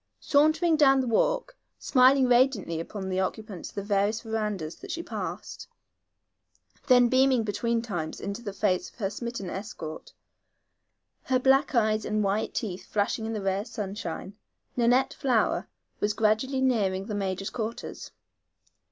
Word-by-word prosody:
Sauntering 310 +3 +3
down 270 -3 +5
the 260 - 0
walk, - - +1 0.2
smiling 260 0 +4
radiantly 240 -9 +2
upon 190 +3 -5
the 185 0 -1
occupants 195 0 -4
of - - -19
the 200 - -3
various 205 +2 +1
verandas 210 -8 -3
that - - -11
she 335 - -3
passed, 190 - -6 1.2
then 245 -2 +6
beaming 260 -1 +3
between 230 +3 -1
times 175 -9 -4
into 200 +3 -5
the 210 -4 -5
face 195 -2 0
of - - -27
her 200 -4 -2
smitten 235 -2 -5
escort, 175 -5 -7 1.1
her 260 - +2
black 270 +2 +3
eyes 215 -2 +2
and 215 0 0
white 200 +2 -1
teeth 190 -5 -4
flashing 215 +2 -1
in 225 - -3
the 210 -2 -3
rare 195 +1 0
sunshine, 200 -3 -6 0.4
Nanette 245 +2 +3
Flower 250 -5 +1 0.3
was 210 0 +1
gradually 220 +5 +1
nearing 200 -7 +1
the 215 - -5
major's 195 -1 -2
quarters. 230 -1 -5
215 Hz, 145 wpm, -27 LUFS, 195-250 Hz, 1.2 s, then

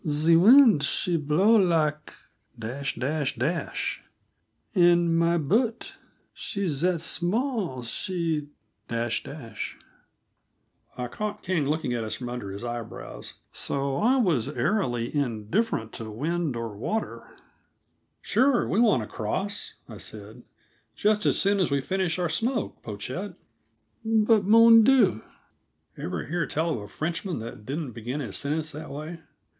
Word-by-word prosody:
"The 155 +2 +3
weend 225 - +7
she 175 +4 +1
blow 165 +9 +3
lak, 155 -4 +1 0.5
and 140 +4 -2 1.8
my 170 +1 +3
boat, 220 - 0 0.4
she 200 -2 -3
zat 170 +3 +1
small, 180 - 0
she 165 - -1 0.3
." - - -46
I 115 +1 -4 1.5
caught 210 - -5
King 170 -6 0
looking 150 -4 -1
at 115 -2 -2
us 110 - -2
from 125 -1 -6
under 120 -5 -5
his 100 +3 -7
eyebrows, 120 - -6 0.2
so 140 -1 -1
I 240 - +3
was 160 - +1
airily 145 - -1
indifferent 120 - -1
to 110 -1 -6
wind 155 +5 -2
or 115 -3 -5
water. 215 - -4 0.9
"Sure, 260 -2 +2
we 200 - +1
want 210 - +4
to - - -8
cross," 195 - -3
I - - -10
said. - - -7 0.5
"Just 210 0 +2
as - - +3
soon 200 +1 +2
as 185 - +2
we 140 0 +1
finish 185 +3 -1
our 180 -1 0
smoke, 230 +7 -2
Pochette." 130 - -6 0.7
"But, 220 -2 +3
mon 230 +2 +8
Dieu!" 225 - +4 0.7
(Ever - - -4
hear 175 +2 -2
tell 165 +2 0
of - - -3
a 105 - -8
Frenchman 170 - -3
that 110 -1 -8
didn't 145 -1 -3
begin 120 +5 -5
his 135 - -5
sentences 155 +2 -2
that 155 +2 -8
way? 155 +4 -7
160 Hz, 130 wpm, -26 LUFS, 125-200 Hz, 1.8 s, mon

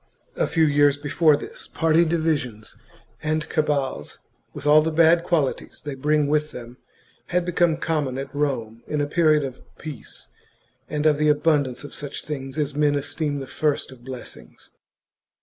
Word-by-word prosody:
A - - +1
few 165 -1 +2
years 145 -1 +4
before 150 +1 +3
this, - - -7
party 165 +1 +3
divisions 155 -10 -1 0.5
and 155 0 -1
cabals, 140 - -1
chap. - - -32 0.3
with - - -7
all 150 +1 +7
the 160 +1 -1
bad 165 +1 +5
qualities 160 -7 -1
they 145 - -3
bring 150 +2 +1
with 150 +1 +1
them, 120 -1 -10 0.5
had 180 0 0
become 175 -2 +2
common 150 -6 -1
at 135 - -6
Rome 125 -6 -2
in 150 - -2
a 145 - +1
period 155 -1 +3
of 130 -2 -6 0.2
peace 155 -3 -8 0.6
and 150 0 -2
of 150 -2 +4
the 150 0 +3
abundance 150 -4 +1
of 145 - -9
such 145 -1 -6
things 135 -2 -5
as 150 -2 -1
men 145 0 +2
esteem 145 +1 -2
the 135 - -5
first 145 0 -1
of 125 -2 -14
blessings. 130 -1 -10
150 Hz, 165 wpm, -23 LUFS, 140-155 Hz, 0.6 s, all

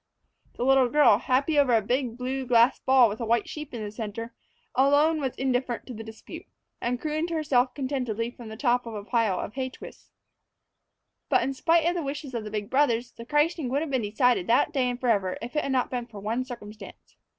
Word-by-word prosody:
The 245 - -2
little 265 -2 +4
girl, 290 -6 +5
happy 275 +5 +1
over 255 -4 +4
a 225 - +3
big, 245 +1 -1
blue 260 +1 -3
glass 235 +1 +4
ball 260 -2 +5
with 210 0 -5
a - - -1
white 230 -1 +1
sheep 300 -1 -7
in 230 -3 -5
the 205 - -5
center, 225 +1 -6 0.4
alone 290 +4 +3
was 265 -3 -2
indifferent 255 -2 -1
to 255 - -8
the 225 0 -7
dispute, 220 0 -10 0.3
and 245 +1 -1
crooned 310 +3 -2
to 335 - -3
herself 270 -5 +1
contentedly 250 -5 -2
from 240 -2 -11
the 220 - -8
top 245 -1 +1
of 225 - -6
the 205 - -5
pile 225 -6 +1
of - - -5
hay 260 0 -3
twists. - - -13 1.2
But, - - +3
in 275 - -1
spite 330 +4 +2
of 345 - +2
the 350 - -2
wishes 280 -1 -5
of 230 -2 -3
the 210 - -6
big 210 -1 -4
brothers, 245 -3 +1
the 230 - -11
christening 295 -1 +1
would 275 +3 0
have 315 -3 -4
been 260 -2 +1
decided 215 -1 +1
that 245 +6 +3
day 260 -3 +1
and 245 0 -4
forever 205 -7 +1
if 240 +5 -8
it 300 - +2
had 275 - -3
not 255 -1 0
been 245 -2 -3
for 215 -4 -10
one 225 +5 -2
circumstance. 220 -4 -11
250 Hz, 225 wpm, -26 LUFS, 230-275 Hz, 1.2 s, girl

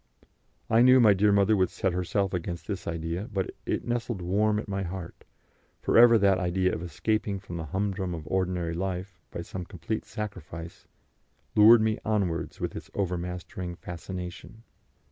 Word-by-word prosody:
I 115 +1 +4
knew 130 +1 +7
my 110 -4 +7
dear 100 +2 +3
mother 100 +2 +4
would 95 -3 +2
set 95 - -1
herself 90 +2 0
against 85 -1 -4
this 100 -3 -4
idea, 85 +6 -3
but 95 -3 -2 0.2
it - - -1
nestled 120 -3 -2
warm 105 +4 +1
at 110 - -4
my 100 -1 -2
heart, 90 -1 -7 0.5
for - - 0
ever 115 0 +8
that 100 -2 +3
idea 90 0 +1
of - - -3
escaping 100 +3 -1
from 90 -3 -7
the 80 - -4
humdrum 95 +1 -2
of 80 -2 -8
ordinary 90 -1 -1
life 90 +1 -4
by 85 - -6
some 90 +1 -6
complete 105 +4 -4
sacrifice 85 -5 -7 0.7
lured 110 +2 +8
me 110 -1 +1
onwards 100 -6 -1
with - - -3
its - - -8
overmastering 90 -1 -3
fascination. 90 +5 -8
95 Hz, 165 wpm, -28 LUFS, 90-105 Hz, 0.7 s, ever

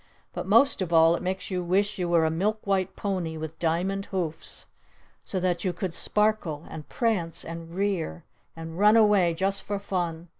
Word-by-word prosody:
But - - -5
most 275 -7 +4
of 180 -2 -2
all 165 0 +6
it - - -5
makes 190 +2 -3
you 180 -1 -1
wish 200 +3 0
you 175 -1 -1
were 170 -2 +4
a 160 - +1
milk 210 +6 -1
white 190 -1 0
pony 180 -5 -3
with 160 0 -7
diamond 180 +4 -1
hoofs! 170 -5 -4 0.6
So 190 - -3
that 180 -1 0
you 185 -3 0
could 185 -3 -4
sparkle! 210 -7 0
And 155 -2 -9
prance! 200 -9 -1
And 165 0 -8
rear! 185 - -2 0.3
And 165 +1 -8
run 210 +2 +6
away 205 -6 +4
just 195 +3 0
for 205 +1 -3
fun! 175 -4 -3
180 Hz, 185 wpm, -26 LUFS, 165-200 Hz, 0.6 s, all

